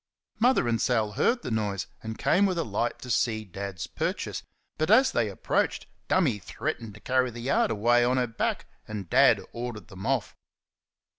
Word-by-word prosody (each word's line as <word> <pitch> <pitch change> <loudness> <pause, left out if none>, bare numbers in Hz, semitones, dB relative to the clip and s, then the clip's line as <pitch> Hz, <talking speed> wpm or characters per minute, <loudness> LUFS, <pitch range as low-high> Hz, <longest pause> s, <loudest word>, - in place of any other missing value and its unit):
Mother 245 - +3
and 115 -1 +1
Sal 110 -4 +1
heard 240 - +1
the - - -4
noise, 105 -3 -1 0.2
and 110 0 -6
came 200 +2 +3
with 185 -2 -1
a 165 - +1
light 120 -5 -2
to 125 - -8
see 110 -2 +1
Dad's 95 -1 -5
purchase, - - -3 0.4
but 155 - +1
as 260 +5 +6
they - - +1
approached - - -1 0.2
"Dummy" 140 - +2
threatened 105 +2 -5
to - - -12
carry 130 +2 +1
the 120 0 -9
yard 130 - +2
away 120 +3 +3
on 125 +2 +2
her 125 - +2
back, 115 -1 -2 0.2
and 105 -5 -6
Dad - - +6
ordered 120 -2 -6
them 95 +1 -7
off. 130 -6 0
120 Hz, 180 wpm, -27 LUFS, 105-130 Hz, 0.4 s, as